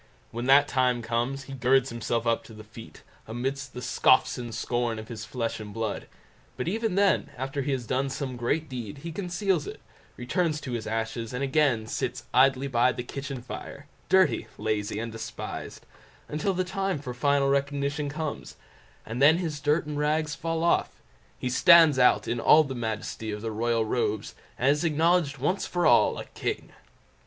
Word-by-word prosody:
When 120 +2 -4
that 140 +2 +6
time 125 -2 +1
comes, 120 +4 -1
he 135 - -9
girds 130 +1 +2
himself 115 0 -2 0.2
to 110 - -14
the 110 - -10
feat, 110 +1 -13 0.2
amidst 135 +4 -4
the 125 - -6
scoffs 130 - +3
and 120 -1 -6
scorn 120 0 -1
of 110 0 -8
his 110 -3 -6
flesh 115 0 -3
and 105 -1 -8
blood; 110 -1 -4 0.5
but 125 - -3
even 220 +1 -1
then, 200 -1 +2
after 135 +3 -3
he 140 - -2
has 125 -3 -3
done 135 +4 0
some 135 -1 -4
great 135 +7 -1
deed, 125 -2 -7
he 170 - -4
conceals 180 -1 -1
it, - - -7 0.4
returns 150 +5 0
to 130 - -6
his 120 -2 -3
ashes, 115 +1 -3
and 125 +2 -2
again 135 -5 +2
sits - - -3
idly 130 +1 +4
by 125 -1 +3
the 125 - -5
kitchen 135 0 -6
fire, 140 +2 -8 0.2
dirty, 190 -11 +3
lazy, 105 -2 -2
and 115 +1 -4
despised, 115 0 -7 0.4
until 155 +6 -1
the 185 - +1
time 195 0 -2
for 130 -3 -6
final 140 +1 +2
recognition 140 +1 0
comes, 155 +1 -5 0.5
and 115 +4 -5
then 155 +4 +7
his 160 -5 -3
dirt 150 +3 +2
and 150 -1 -4
rags 150 0 0
fall 165 0 -2
off—he 125 - -2
stands 165 0 +7
out 125 - +4
in 120 - -1
all 155 +6 +6
the 135 -3 -5
majesty 110 -2 -4
of 105 +1 -6
his 115 - -2
royal 115 +1 0
robes, 110 -2 -1 0.2
and 130 +3 +3
is 150 +3 0
acknowledged 160 -2 +2
once 150 +9 -1
for 175 -1 -1
all, 120 - +5
a - - -6
king. - - -4
135 Hz, 180 wpm, -27 LUFS, 120-150 Hz, 0.5 s, then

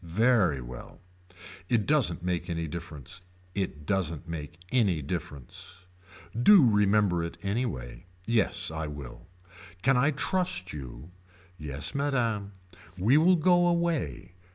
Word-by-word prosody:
Very 90 - +2
well. - - -10 0.7
It 115 -4 +2
doesn't 125 - +2
make 90 0 -2
any 85 -1 -2
difference. 85 -1 -8 0.3
It 90 -6 -3
doesn't 85 -4 -1
make 80 -1 -6
any 100 - +2
difference. 80 +3 -7 0.5
Do 145 - +7
remember 105 -4 +3
it 85 - -5
any 110 +6 0
way. 65 - -7 0.2
Yes 110 -7 +1
I 80 -1 -4
will. 75 +4 -9 0.6
Can 135 0 +4
I 140 +4 +4
trust 140 - -1
you. 70 +2 -9 0.5
Yes 75 -2 -5
Madame. 115 -8 -1 0.4
We 110 +10 +4
will 175 +4 +5
go 175 +1 +4
away. 170 - -1
95 Hz, 125 wpm, -28 LUFS, 80-125 Hz, 0.7 s, Do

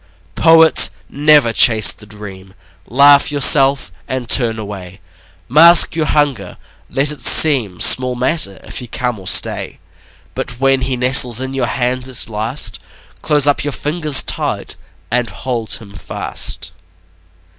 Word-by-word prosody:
Poet, 160 -1 +4 0.2
never 145 -5 +1
chase 110 -6 +4
the 105 - -17
dream. 100 -2 -12 0.3
Laugh 140 +4 +3
yourself 135 - +2 0.2
and 130 -2 -6
turn 115 -2 0
away. 95 -3 -10 0.5
Mask 165 +5 +4
your 160 -2 -3
hunger; 140 -11 -3 0.3
let 140 +3 0
it 150 - -4
seem 120 - +4
Small 130 -1 +3
matter 125 - -1
if - - -8
he 125 - -9
come 125 -2 -5
or 95 - -10
stay; - - 0 0.6
But 125 -1 -7
when 135 -1 0
he 130 0 -3
nestles 125 -1 +4
in 130 +1 -5
your 135 - -3
hand 125 -1 -4
at 130 -3 -3
last, 110 +5 -3 0.4
Close 150 -2 +1
up 145 -1 -1
your 145 -1 -5
fingers 150 -1 +1
tight - - -4 0.4
and 120 -1 -2
hold 115 0 -5
him 100 -3 -8
fast. 95 - -3
130 Hz, 140 wpm, -13 LUFS, 110-145 Hz, 0.6 s, Poet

